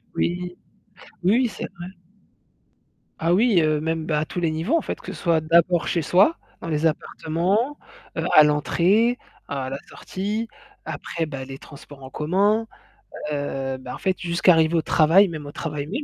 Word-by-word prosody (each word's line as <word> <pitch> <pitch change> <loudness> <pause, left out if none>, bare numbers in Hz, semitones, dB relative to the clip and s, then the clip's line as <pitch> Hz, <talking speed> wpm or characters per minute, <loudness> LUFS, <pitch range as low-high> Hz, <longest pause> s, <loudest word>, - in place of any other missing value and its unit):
Oui, 175 +1 0 0.8
oui, 185 +4 +3
oui, 245 +1 +3
c'est - - -7
vrai. 175 +1 -7 1.3
Ah 165 +1 +2
oui 210 -1 +4
heu, 155 -1 +2
même 160 0 -2
bah 150 -2 0
à 155 - -1
tous 175 - -5
les 165 -2 0
niveaux 170 - 0
en - - 0
fait, - - -5
que - - -8
ce - - -9
soit 165 -3 +2
d'abord 170 +2 +3
chez 170 -3 0
soi, 195 - +4 0.2
dans - - -6
les 155 0 0
appartements, 180 - -1 0.4
heu - - -2
à 155 - +10
l'entrée, 185 +11 +2 0.3
à 135 -2 -3
la 135 - -3
sortie, 210 +4 -4 0.4
après 165 -1 -4
bah 135 -4 -6
les 135 0 -8
transports 145 -1 -13
en 130 - -10
commun, 205 +8 +1 0.6
heu, 135 -2 -3
bah 130 -1 -8
en - - -8
fait, 190 -1 -1
jusqu'à 175 +1 +3
arriver 160 0 +3
au 165 - +3
travail, 170 +6 +4
même 155 -3 -7
au 145 - -7
travail 150 -3 -4
même. 250 - -3
165 Hz, 185 wpm, -23 LUFS, 150-190 Hz, 1.3 s, à